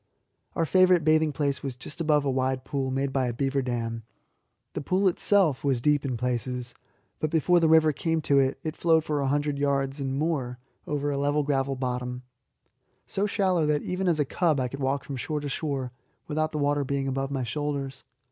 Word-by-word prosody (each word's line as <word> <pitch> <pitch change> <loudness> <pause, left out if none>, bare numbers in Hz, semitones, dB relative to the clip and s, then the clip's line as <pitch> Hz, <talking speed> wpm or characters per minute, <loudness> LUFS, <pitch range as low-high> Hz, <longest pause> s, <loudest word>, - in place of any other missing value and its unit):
Our 165 - +1
favourite 185 0 +4
bathing 155 0 +3
place 140 -1 -1
was 135 -3 -4
just 145 +6 -8
above 150 -3 +2
a 135 - +1
wide 130 0 0
pool 135 -2 -2
made 135 +1 -1
by 130 -2 +1
a 120 - -2
beaver 135 +2 0
dam. 115 -2 -3 0.7
The - - -3
pool 185 +6 +1
itself 185 -5 +2
was 135 -4 +1
deep 145 +3 +2
in 130 -4 -2
places, 125 0 -2 0.5
but 155 - 0
before 170 +3 +3
the 165 -1 +3
river 160 -1 +5
came 165 +3 0
to 140 -2 +3
it, 135 0 +1
it 155 0 -3
flowed 160 -2 +3
for 150 -2 -1
a 135 - 0
hundred 145 +1 0
yards 140 0 0
and 135 -1 -2
more 140 -6 -1 0.3
over 145 0 -1
a 140 - -1
level 145 +1 +1
gravel 135 -1 0
bottom, 125 -1 -3 0.8
so 200 +2 -1
shallow 185 -6 +1
that 150 -1 +1
even 180 +1 -2
as 165 -3 +2
a 145 - +2
cub 155 0 +1
I 125 -1 -1
could 140 - -7
walk 135 +1 0
from 140 - -6
shore 150 +4 -2
to 145 -1 -5
shore 135 -4 -3 0.4
without 155 0 -1
the 155 - -3
water 145 0 +1
being 135 0 -2
above 135 0 -2
my 135 -2 -2
shoulders. 140 +2 -3
140 Hz, 205 wpm, -27 LUFS, 135-155 Hz, 0.8 s, river